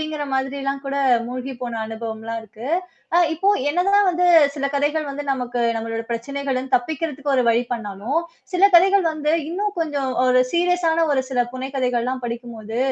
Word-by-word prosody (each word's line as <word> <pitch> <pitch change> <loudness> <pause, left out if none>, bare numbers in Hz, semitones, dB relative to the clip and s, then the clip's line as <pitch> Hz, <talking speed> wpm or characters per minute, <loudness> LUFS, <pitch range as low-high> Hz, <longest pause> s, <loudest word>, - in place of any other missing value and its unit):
அப்பிடிங்கிற 305 -1 -3
மாதிரி 265 +1 -1
எல்லாம் 275 0 -2
கூட 275 0 -2 0.3
மூழ்கி 255 +1 -5
போன 235 -2 -3
அனுபவம்லாம் 225 0 -5
இருக்கு. 220 +3 -10 0.5
அ - - +6
இப்போ 360 +5 0 0.2
என்னதான் 390 +6 +3
வந்து 360 0 +2 0.3
சில 280 -1 -2
கதைகள் 295 +2 0
வந்து 280 +1 -4
நமக்கு 250 -2 -2 0.2
நம்மளோட 225 0 -3
பிரச்சனைகள 270 +2 -2
தப்பிக்கிறதுக்கு 290 +2 -1
ஒரு 255 - +4
வழி 230 +1 +3
பண்ணாலும், 230 +6 -2 0.3
சில 360 - 0
கதைகள் 385 +2 +6
வந்து 305 0 -1 0.2
இன்னும் 405 +4 -2
கொஞ்சம் 285 -5 -1
ஒரு 255 0 +4
சீரியஸ் 355 0 +2
ஆன 330 +1 +2
ஒரு 265 -2 +2
சில 250 -2 +1
புனை 255 +1 -5
கதைகள் 250 -2 +1
எல்லாம் 255 0 -3
படிக்கும் 235 0 -5
போது, 220 +2 -5
270 Hz, 170 wpm, -22 LUFS, 240-315 Hz, 0.5 s, அ